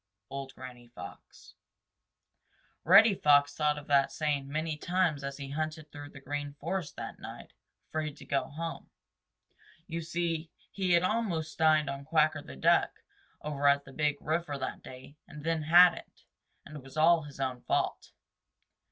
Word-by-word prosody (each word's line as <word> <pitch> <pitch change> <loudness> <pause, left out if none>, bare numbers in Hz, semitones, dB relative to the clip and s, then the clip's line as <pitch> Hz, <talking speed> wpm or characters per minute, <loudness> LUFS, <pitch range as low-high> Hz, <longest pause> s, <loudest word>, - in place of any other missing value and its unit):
—Old 135 -1 -6
Granny 125 -2 -11
Fox. 120 - -12 1.3
Reddy 200 +6 +7
Fox 145 -4 +4
thought 150 0 +1
of 145 - -8
that 140 -2 +3
saying 145 -3 -1
many 155 +2 -2
times 170 -3 0
as 140 0 -5
he 140 -1 -7
hunted 155 +1 -4
through 145 0 -9
the 140 - -12
Green 145 +1 -5
Forest 170 +1 -3
that - - -7
night, - - -10 0.3
afraid 155 -1 -4
to - - -12
go 140 - 0
home. 165 +3 -6 1.0
You 170 -1 -4
see, 165 -1 -2 0.2
he 185 -3 0
had 170 +1 +4
almost 185 -7 -1
dined 155 -2 +4
on 140 0 -4
Quacker 155 0 +2
the 70 - -11
Duck 65 - +2 0.4
over 145 -1 0
at 140 0 +4
the 135 - -13
Big 150 -1 0
River 155 -2 -2
that 130 - -5
day 130 +3 -12
and 150 -1 -11
then 165 0 0
hadn't, 175 +3 +4 0.4
and 150 - -11
it - - -9
was 135 +3 -13
all 165 +1 +5
his 145 -2 -11
own 130 -2 -2
fault. - - -1
150 Hz, 160 wpm, -30 LUFS, 140-165 Hz, 1.3 s, Reddy